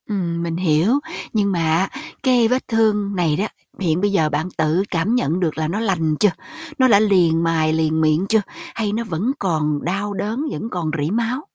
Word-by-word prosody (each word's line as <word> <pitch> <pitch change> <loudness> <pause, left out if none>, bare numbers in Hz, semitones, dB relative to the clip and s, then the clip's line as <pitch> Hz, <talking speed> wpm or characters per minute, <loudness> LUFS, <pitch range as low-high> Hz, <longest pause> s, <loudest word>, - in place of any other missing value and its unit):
Ừm, 170 -5 -2
mình 165 -1 -2
hiểu, 180 - +2 0.3
nhưng 205 -3 +1
mà 175 - 0
á, 165 +4 +1 0.3
cái 250 -3 +4
vết 255 +3 -1
thương 210 -3 +1
này 165 -4 +1
đó, 200 +7 -1 0.3
hiện 175 -2 0
bây 205 0 +1
giờ 160 -6 +2
bạn 150 +3 -1
tự 160 +3 +2
cảm 180 +7 +1
nhận 170 - 0
được 165 -5 -1
là 155 -1 -1
nó 185 +7 -2
lành 170 -8 0
chưa? 210 - +5 0.5
Nó 260 -2 +5
đã 205 -5 +6
liền 175 -6 +3
mài, 160 -1 +1
liền 160 0 +1
miệng 155 +3 +2
chưa? 220 -1 +4 0.3
Hay 210 -3 -1
nó 230 +2 -1
vẫn 205 +4 -2
còn 150 -5 -1
đau 200 +4 -2
đớn, 220 +9 -3
vẫn 225 - -5
còn 170 -6 -3
rỉ 155 - -1
máu? 235 +4 -1
185 Hz, 210 wpm, -20 LUFS, 160-215 Hz, 0.5 s, đã